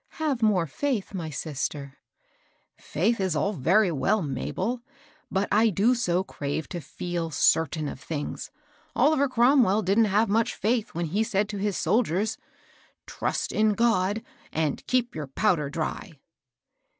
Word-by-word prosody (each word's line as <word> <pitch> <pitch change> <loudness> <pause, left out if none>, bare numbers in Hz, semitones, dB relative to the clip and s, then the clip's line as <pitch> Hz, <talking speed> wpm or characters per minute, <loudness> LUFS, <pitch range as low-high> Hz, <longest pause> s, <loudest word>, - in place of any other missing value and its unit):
Have 295 -6 -1
more 205 -6 +3
faith, 220 - -2
my 170 -4 -4
sister." 145 -2 -4 0.8
Faith 210 +9 -1
is 190 -4 0
all 200 +8 0
very 185 +5 +3
well, 185 +8 +1
Mabel; 155 - -3 0.5
but 195 +1 0
I 220 +2 +4
do 210 +6 +3
so 185 -7 +1
crave 145 -2 -4
to 175 - -5
feel 170 +3 -4
eertain 155 0 +2
of 130 - -6
things 145 0 -5 0.5
I - - 0
Oliver 280 -2 +4
Cromwell 235 -4 +4
didn't 200 +5 +3
have 210 +2 +2
much 225 +4 +1
faith 225 -2 -1
when 170 0 -1
he 190 +7 -1
said 210 -2 0
to 210 - -4
his 205 -1 -1
soldiers, 210 +2 +1 0.3
* - - -30 0.3
Trust - - -2
in 215 0 +3
God, 220 -2 +1 0.2
— - - -27
and 155 -2 -1
ke^ 250 -1 +1
your 150 -2 -5
powder 150 0 +1
dry 165 +5 -4
195 Hz, 155 wpm, -26 LUFS, 160-225 Hz, 0.8 s, I